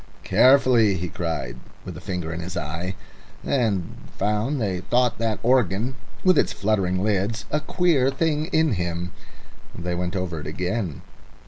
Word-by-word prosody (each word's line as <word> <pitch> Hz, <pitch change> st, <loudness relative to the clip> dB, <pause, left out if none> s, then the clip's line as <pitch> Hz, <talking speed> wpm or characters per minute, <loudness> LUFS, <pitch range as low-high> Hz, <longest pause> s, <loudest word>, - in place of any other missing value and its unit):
"Carefully," 125 Hz, -6 st, +5 dB
he 90 Hz, -1 st, -3 dB
cried, 80 Hz, -9 st, -3 dB, 0.3 s
with -, -, -6 dB
a -, -, -9 dB
finger 90 Hz, -3 st, -3 dB
in 85 Hz, -, -4 dB
his 85 Hz, +2 st, -5 dB
eye, 85 Hz, +4 st, -3 dB, 0.5 s
and 110 Hz, -10 st, 0 dB, 0.2 s
found 105 Hz, +8 st, 0 dB
they 95 Hz, -5 st, -1 dB
thought 120 Hz, +2 st, +1 dB
that 115 Hz, -2 st, 0 dB
organ, 120 Hz, -1 st, +2 dB, 0.3 s
with 185 Hz, -1 st, +5 dB
its -, -, +2 dB
fluttering 95 Hz, -3 st, 0 dB
lids, 105 Hz, +2 st, 0 dB
a 150 Hz, -, +2 dB
queer 155 Hz, -4 st, +2 dB
thing 155 Hz, +2 st, 0 dB
in 160 Hz, -6 st, +2 dB
him. 85 Hz, -1 st, -2 dB, 0.7 s
They 90 Hz, 0 st, -3 dB
went 90 Hz, +2 st, -2 dB
over 90 Hz, -3 st, -2 dB
it 75 Hz, -, -7 dB
again. 90 Hz, -, -3 dB
100 Hz, 150 wpm, -24 LUFS, 90-125 Hz, 0.7 s, Carefully